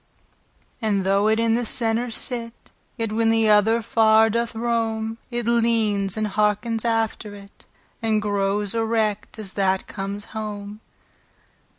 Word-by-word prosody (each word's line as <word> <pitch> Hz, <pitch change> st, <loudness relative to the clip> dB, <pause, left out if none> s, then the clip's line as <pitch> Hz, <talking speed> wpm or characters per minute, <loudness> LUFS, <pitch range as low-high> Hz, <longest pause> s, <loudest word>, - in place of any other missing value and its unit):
And 205 Hz, -3 st, +1 dB
though 195 Hz, +2 st, +2 dB
it 220 Hz, +1 st, +2 dB
in 230 Hz, 0 st, +2 dB
the 240 Hz, +1 st, +1 dB
center 230 Hz, +1 st, 0 dB
sit, 230 Hz, 0 st, -5 dB, 0.3 s
Yet 225 Hz, -2 st, -2 dB
when 225 Hz, +1 st, +2 dB
the 225 Hz, -1 st, +3 dB
other 220 Hz, +2 st, +4 dB
far 220 Hz, 0 st, +4 dB
doth 235 Hz, +1 st, -1 dB
rome, 225 Hz, -1 st, -1 dB
It 240 Hz, -2 st, -3 dB
leanes, 225 Hz, -4 st, +1 dB
andhearkens 215 Hz, +1 st, 0 dB
after 225 Hz, -2 st, -1 dB
it, 200 Hz, 0 st, -16 dB, 0.3 s
And 220 Hz, -1 st, +1 dB
growes 205 Hz, 0 st, -1 dB
erect, 220 Hz, -2 st, -1 dB
as 210 Hz, -3 st, -7 dB
that 190 Hz, -1 st, 0 dB
comes 200 Hz, +1 st, -5 dB
home. 210 Hz, -1 st, -6 dB
220 Hz, 130 wpm, -23 LUFS, 205-230 Hz, 0.3 s, other